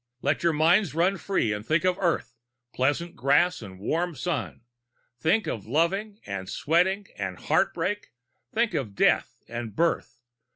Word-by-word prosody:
Let 145 +2 +1
your 170 -1 +3
minds 165 +3 +3
run 180 +4 +2
free 155 - 0
and 105 0 -5
think 155 +8 +1
of 185 -1 +3
Earth, 170 -8 0 0.4
pleasant 145 +7 0
grass 175 +6 +3
and 95 -4 -10
warm 165 - -1
sun! 125 - -3 0.6
Think 180 - +2
of 110 -9 -4
loving 195 - 0
and 100 -1 -5
sweat 170 +4 +3
and 200 +2 -4
heartbreak! 205 0 0 0.4
Think 230 0 +1
of 110 -8 -3
death - - +2
and 120 -3 -6
birth! 165 -4 0
165 Hz, 150 wpm, -26 LUFS, 120-185 Hz, 0.6 s, your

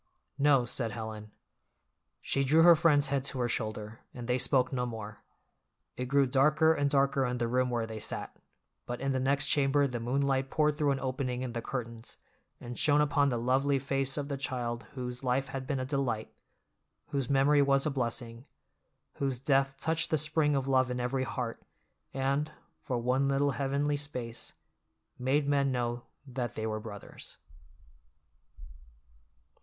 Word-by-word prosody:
"No," 140 -3 +4
said 120 -1 -2
Helen. 110 -1 -6 0.9
She 135 - 0
drew 155 +5 +5
her 170 0 +9
friend's 155 -4 +4
head 135 -2 +1
to 140 - -4
her 120 - +1
shoulder, 110 -1 -3 0.2
and 120 -1 -6
they 125 +1 +1
spoke 130 0 +2
no 125 -1 -1
more. 110 -2 -7 0.7
It 125 - -3
grew 140 +1 +4
darker 150 +5 +4
and 145 -2 +1
darker 140 -1 +2
in 125 -1 -1
the 120 -1 0
room 125 +1 +1
where 120 -2 -1
they 110 -1 -6
sat, - - -4 0.5
but 120 0 -4
in 135 +1 -1
the 130 - 0
next 140 +2 +2
chamber 140 0 +3
the 125 -3 -3
moonlight 135 +2 0
poured 150 0 +2
through 150 -1 +1
an 135 -1 +1
opening 130 -1 -2
in 125 -2 -4
the 115 - -3
curtains 115 -2 -6 0.4
and 120 0 -7
shone 145 -1 +4
upon 145 -1 +3
the 120 - -1
lovely 135 +4 +2
face 135 0 -1
of 145 -1 -2
the 140 -1 -3
child 120 -4 -3
whose 125 0 -4
life 130 +2 0
had 135 -1 -5
been 140 -2 -1
a 130 - -2
delight, 130 -5 -2 0.8
whose 140 -4 -2
memory 140 +1 +4
was 135 -1 +3
a 155 - +1
blessing, 120 -1 -4 0.7
whose 135 -3 -1
death 135 0 +2
touched 160 +3 0
the 155 - +2
spring 150 0 +1
of 135 -1 -1
love 130 -1 +3
in 125 0 -2
every 130 +2 -1
heart, 125 -4 -4 0.5
and, 140 +3 0 0.3
for 125 - -2
one 125 +3 +1
little 140 +1 +2
heavenly 140 +1 0
space, 125 -5 -5 0.7
made 140 +3 +1
men 140 -1 +2
know 120 -1 -2 0.2
that 125 -2 -4
they 110 - -3
were 110 -1 -2
brothers. 105 -2 -9
135 Hz, 170 wpm, -30 LUFS, 120-140 Hz, 0.9 s, her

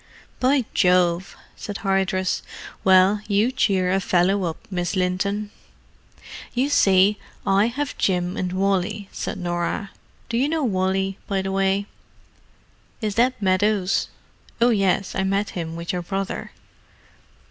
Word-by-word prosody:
"By 260 -1 +2
Jove!" 180 0 +2 0.2
said 205 -1 -6
Hardress. 190 -1 +1 0.4
"Well, 190 +2 +5
you 210 +4 +2
cheer 190 -7 +1
a 190 - +2
fellow 185 +1 +2
up, 165 -1 -3
Miss 180 +1 -2
Linton." 200 +3 -1 1.0
"You 260 +4 +1
see, 195 -4 +4 0.3
I 195 +3 +3
have 280 +4 -3
Jim 180 -1 0
and 180 -1 -2
Wally," 195 +2 -1
said - - -4
Norah. 175 +2 -2 0.4
"Do 230 - -2
you 270 +4 +2
know 320 -1 0
Wally, 190 -2 0
by 195 -2 -1
the 190 - -3
way?" 195 +1 +1 1.1
"Is 215 -3 -2
that 250 +3 +2
Meadows?—oh 200 +4 0
yes, 195 -3 +1
I 190 - -1
met 195 +1 0
him 165 -2 -5
with 170 +1 -4
your 180 - -2
brother." 195 +2 -4
195 Hz, 130 wpm, -23 LUFS, 185-210 Hz, 1.1 s, Well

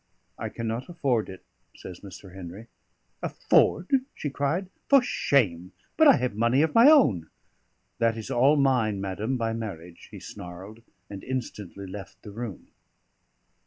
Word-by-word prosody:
"I - - -5
cannot 115 +4 -4
afford 135 -11 0
it," 95 -1 -11 0.3
says 90 -1 -10
Mr. 95 -1 -12
Henry. 95 +3 -9 0.6
"Afford?" 175 +4 +2 0.2
she 145 - -4
cried. 145 +7 -1 0.2
"For 280 - +8
shame! 100 - 0 0.2
But 315 - +6
I 275 - +8
have 125 -4 -1
money 120 +6 +2
of 160 - 0
my 235 +5 +8
own." 110 - +4 0.7
"That 115 -1 +2
is 110 - -6
all 135 +5 +4
mine, 125 -8 +2
madam, 100 +6 -2
by 115 -1 -1
marriage," 90 -7 -7
he - - -10
snarled, 95 +5 -10 0.3
and 100 -1 -9
instantly 105 -7 -5
left 95 0 -10
the 105 - -9
room. 110 -3 -7
115 Hz, 145 wpm, -26 LUFS, 95-135 Hz, 0.7 s, For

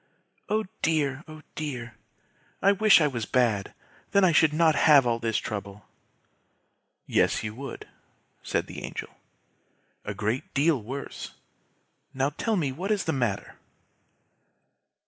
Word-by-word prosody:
Oh 215 +1 +1 0.2
dear! 150 -3 0
Oh 155 0 -11
dear! 125 -7 -5 0.7
I 200 - +5
wish 210 0 +6
I - - +4
was 120 -7 -2
bad; 115 -6 +1 0.4
then 200 - +5
I 185 - +5
should 160 -1 +5
not 160 +1 +4
have 145 -4 +6
all 115 -1 +1
this 115 -1 0
trouble." 100 -1 -5 1.2
"Yes, - - +1
you 105 0 -4
would," 135 +4 -8 0.5
said - - -1
the - - -8
Angel; - - -6 0.9
"a - - -5
great 125 - -3
deal 145 -2 +3
worse. 135 +6 -7 0.8
Now 135 +2 +1
tell 220 +9 -1
me 150 -8 0
what 180 +9 -5
is 210 -2 +1
the 160 - -1
matter!" 120 -7 -2
140 Hz, 135 wpm, -27 LUFS, 120-165 Hz, 1.2 s, wish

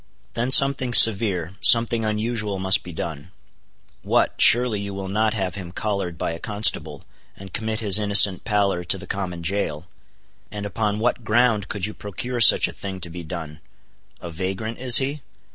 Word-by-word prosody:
Then 120 +2 -3
something 135 -2 +4
severe, 100 -6 +4
something 115 -1 +4
unusual 110 -1 -3
must 95 +1 +2
be 90 - -11
done. 80 -1 -8 0.7
What! - - 0
surely 120 -3 +4
you 100 -1 -7
will 95 -1 -7
not 110 +2 -1
have 95 -3 -4
him 95 -3 -9
collared 100 -4 -5
by - - -4
a 85 - -8
constable, 85 -9 -3 0.3
and 95 -1 -13
commit 110 0 -4
his 105 -1 +5
innocent 100 -2 +5
pallor 100 -4 -1
to 90 +2 -1
the 95 - -11
common 90 -3 -6
jail? 85 -4 -4 0.6
And 105 0 -8
upon 105 +1 -3
what 120 +2 -2
ground 110 -2 0
could 100 -3 -3
you 105 - -6
procure 120 +5 -6
such - - +7
a - - -10
thing 95 -1 -8
to 85 -1 -7
be 90 +1 -8
done?—a 80 +2 -12
vagrant, 95 +7 -6
is 125 -2 +4
he? 140 +2 -2
100 Hz, 170 wpm, -21 LUFS, 90-110 Hz, 0.7 s, such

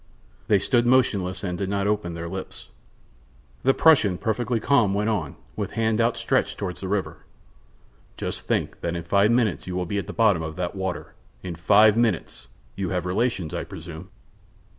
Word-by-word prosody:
They 105 - +5
stood 120 +4 +1
motionless, 105 -8 +2
and 90 -2 -2
did 95 - -2
not 100 0 0
open 105 -5 -1
their 85 0 -5
lips. 95 +2 -7 0.9
The 135 +1 +3
Prussian, 120 - +5
perfectly 120 +1 -1
calm, 110 -5 +3
went 105 +2 +1
on, 80 -9 -2 0.2
with - - -4
hand 110 0 +1
outstretched 115 +1 0
toward 90 -3 -4
the 95 - -6
river: 100 0 -2 1.0
"Just - - -4
think - - -1
that 85 0 -2
in 85 - -4
five 100 +5 +3
minutes 115 -6 +1
you 90 - -4
will 90 0 -1
be 100 +4 -2
at 95 - -6
the - - -5
bottom 105 -7 +3
of 80 -1 -5
that 90 0 -3
water. 95 -2 -4 0.3
In 90 -2 -4
five 105 +5 +5
minutes! 115 - -1 0.3
You 95 -2 -3
have 90 -1 -2
relations, 95 -3 -1
I - - -2
presume?" 85 +2 -9
100 Hz, 180 wpm, -24 LUFS, 90-110 Hz, 1.0 s, They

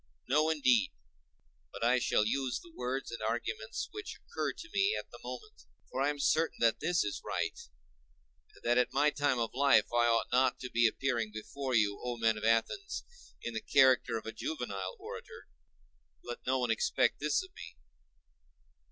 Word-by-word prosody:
No, 150 +4 +3
indeed! 130 -8 +3 0.8
but - - -6
I 125 +2 +4
shall 105 - +2
use 130 +2 -1
the 170 - -15
words 125 +1 -3
and 115 - -6
arguments 120 - -3
which 420 -2 -7
occur 475 - -3
to 345 - -11
me 400 +2 +3
at - - -6
the - - -11
moment; 430 +1 -9 0.3
for - - -2
I 140 - +3
am 145 - -2
certain 160 +3 +1
that 115 -1 +3
this 170 +2 +1
is 105 - -4
right, - - -2 1.0
and - - -19
that 120 +1 +3
at 125 - +2
my 145 +2 +4
time 145 -3 +1
of 115 -1 -1
life 140 +2 +5
I 120 0 +4
ought 115 -1 +1
not 130 +1 +3
to 125 - -6
be 120 0 +4
appearing 120 -2 -1
before 130 +5 -4
you, 105 -2 +2
O 120 -1 -3
men 115 -1 +2
of 105 - -7
Athens, 115 - 0 0.4
in 120 - -4
the 110 - -3
character 130 -4 +4
of 110 - -8
a 110 - -4
juvenile 100 -7 -4
orator: - - -9 0.8
let 120 - -8
no 130 +1 +2
one 125 -2 0
expect 115 - +1
this 150 - +1
of 375 0 -14
me. - - -11
125 Hz, 185 wpm, -32 LUFS, 115-145 Hz, 1.0 s, life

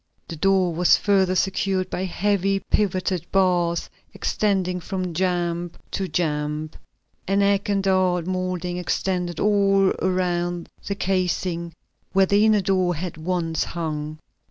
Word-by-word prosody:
The 165 - -5
door 185 +1 +2
was 175 +2 +4
further 190 -3 +2
secured 190 0 0
by 185 - -2
heavy 195 +1 0
pivoted 185 -3 +1
bars 175 -3 +2 0.3
extending 190 -3 0
from 185 0 -4
jamb 175 -1 -1 0.2
to 195 - -2
jamb. 150 -2 -2 0.6
An 200 +1 +2
egg 200 0 +1
and 200 -1 +1
dart 185 -3 +2
molding 185 -1 -2
extended 180 -1 -2
all 195 -2 +3
around 175 -2 -1 0.2
the 200 - -1
casing, 180 -3 -1 0.4
where 195 0 +5
the 200 +2 +3
inner 215 -2 +4
door 185 -2 +1
had 170 +2 -5
once 165 -1 -1
hung. 155 -2 -4
185 Hz, 130 wpm, -23 LUFS, 175-195 Hz, 0.6 s, where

